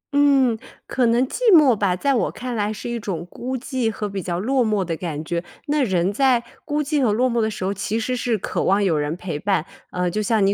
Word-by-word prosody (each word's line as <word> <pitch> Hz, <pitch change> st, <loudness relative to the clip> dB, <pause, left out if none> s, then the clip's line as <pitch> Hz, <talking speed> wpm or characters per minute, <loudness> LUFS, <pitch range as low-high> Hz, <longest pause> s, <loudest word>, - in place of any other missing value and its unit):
嗯， 270 Hz, -5 st, +4 dB, 0.3 s
可 255 Hz, -3 st, +1 dB
能 240 Hz, +3 st, +3 dB
寂 -, -, -6 dB
寞 300 Hz, -, +7 dB
吧， 195 Hz, -3 st, +1 dB
在 275 Hz, +10 st, +1 dB
我 245 Hz, -, +1 dB
看 250 Hz, -1 st, -5 dB
来 210 Hz, 0 st, 0 dB
是 215 Hz, -, -6 dB
一 235 Hz, -1 st, -3 dB
种 175 Hz, -6 st, -4 dB
孤 260 Hz, +2 st, -4 dB
寂 255 Hz, -2 st, -1 dB
和 215 Hz, -1 st, -3 dB
比 195 Hz, -1 st, -4 dB
较 175 Hz, -1 st, -3 dB
落 255 Hz, +6 st, +1 dB
寞 210 Hz, -4 st, 0 dB
的 165 Hz, -1 st, -2 dB
感 160 Hz, -2 st, -5 dB
觉。 170 Hz, +1 st, -2 dB, 0.2 s
那 295 Hz, -1 st, +1 dB
人 190 Hz, -3 st, +1 dB
在 255 Hz, 0 st, +3 dB, 0.2 s
孤 300 Hz, -1 st, 0 dB
寂 295 Hz, 0 st, 0 dB
和 240 Hz, -5 st, +3 dB
落 245 Hz, +4 st, +2 dB
寞 235 Hz, -, +1 dB
的 220 Hz, -, +1 dB
时 205 Hz, -, -6 dB
候 195 Hz, +2 st, 0 dB
其 220 Hz, +3 st, -2 dB
实 250 Hz, +2 st, -1 dB
是 240 Hz, -3 st, 0 dB
渴 -, -, -2 dB
望 200 Hz, +2 st, +3 dB
有 175 Hz, -5 st, +2 dB
人 150 Hz, +2 st, -1 dB
陪 175 Hz, -5 st, -4 dB
伴， 190 Hz, -2 st, 0 dB, 0.2 s
呃， 180 Hz, -1 st, -1 dB
就 215 Hz, -, -1 dB
像 215 Hz, -1 st, +2 dB
你 200 Hz, -, +3 dB
220 Hz, 270 characters per minute, -22 LUFS, 190-255 Hz, 0.3 s, 寞